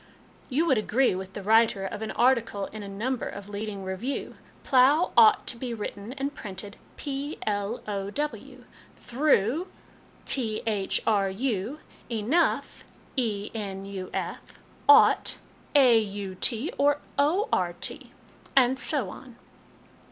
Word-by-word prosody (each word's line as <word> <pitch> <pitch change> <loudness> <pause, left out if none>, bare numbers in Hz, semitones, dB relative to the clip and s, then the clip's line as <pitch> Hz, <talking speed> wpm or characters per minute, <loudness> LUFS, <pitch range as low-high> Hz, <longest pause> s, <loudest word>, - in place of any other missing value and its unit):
" - - -29
You 295 +5 +1
would 265 -9 +3
agree 245 +4 +2
with 190 +1 -6
the 200 - -6
writer 220 -2 +3
of 205 +2 -5
an 220 - -3
article 235 -5 +2
in 215 - -7
a 200 - -7
number 230 +6 -2
of 200 0 -8
a - - -11
leading 205 -1 -5
review: 190 +9 -4
* - - -28
Plough 280 +6 +4
ought 225 -2 +6
to - - -2
be 240 -1 -4
written 210 +1 -6
and 280 +1 -3
printed 200 -3 -7 0.2
plow; 255 -7 -3 0.3
through, 295 +8 -5 0.3
thru; 275 - +1 0.6
enough, 215 -5 -1 2.1
enuf\ 200 -5 -4 0.5
ought, 435 +1 +6 0.4
aut 215 -6 +3 0.3
or 290 +1 +4 0.2
ort*; 285 - +1 0.6
and 260 0 +4
so 270 - -1
on. 250 -3 -12
225 Hz, 110 wpm, -27 LUFS, 200-270 Hz, 2.1 s, ought